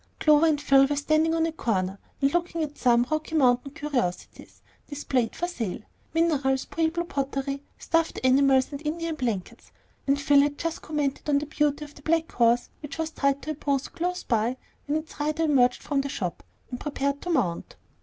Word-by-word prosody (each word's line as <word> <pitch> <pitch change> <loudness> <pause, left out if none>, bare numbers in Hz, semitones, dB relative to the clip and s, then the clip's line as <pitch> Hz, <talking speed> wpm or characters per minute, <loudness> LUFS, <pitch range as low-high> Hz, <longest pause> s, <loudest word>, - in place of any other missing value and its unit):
Clover 305 +1 +5
and 300 -2 +2
Phil 275 -1 +5
were 290 - -1
standing 310 +3 +2
on 325 0 +2
a 330 - -1
corner, 195 -10 -1 0.2
looking 335 +3 +1
at 295 -1 -5
some 240 -2 +3
"Rocky 310 +1 -2
Mountain 260 -1 +3
Curiosities" 280 - -4 0.2
displayed 265 -5 -1
for 350 - -2
sale, 225 - -4 0.3
minerals, 285 -5 +2
Pueblo 330 +1 -1
pottery, 275 -3 -3 0.2
stuffed 330 -1 0
animals, 265 +1 +4
and 285 +1 -7
Indian 330 +2 -2
blankets; 230 -10 -4 0.4
and 275 +1 +2
Phil 280 0 +5
had 290 0 0
just 330 -1 -3
commented 295 -2 -2
on 285 - +4
the 290 - -1
beauty 295 0 0
of 290 -1 -15
a - - -15
black 325 +2 0
horse 235 0 +2
which 295 -1 -7
was 320 -1 -2
tied 280 -2 0
to 310 - -3
a - - -1
post 280 -2 -2
close 360 +1 -2
by, 230 +2 0 0.3
when 295 +2 +1
its 315 0 -8
rider 305 +2 0
emerged 255 -5 +3
from 285 -2 0
a 280 - -4
shop, 180 -9 -4 0.3
and 245 - -5
prepared 280 -1 -2
to 355 - -5
mount. 240 - -1
285 Hz, 185 wpm, -26 LUFS, 265-315 Hz, 0.4 s, Clover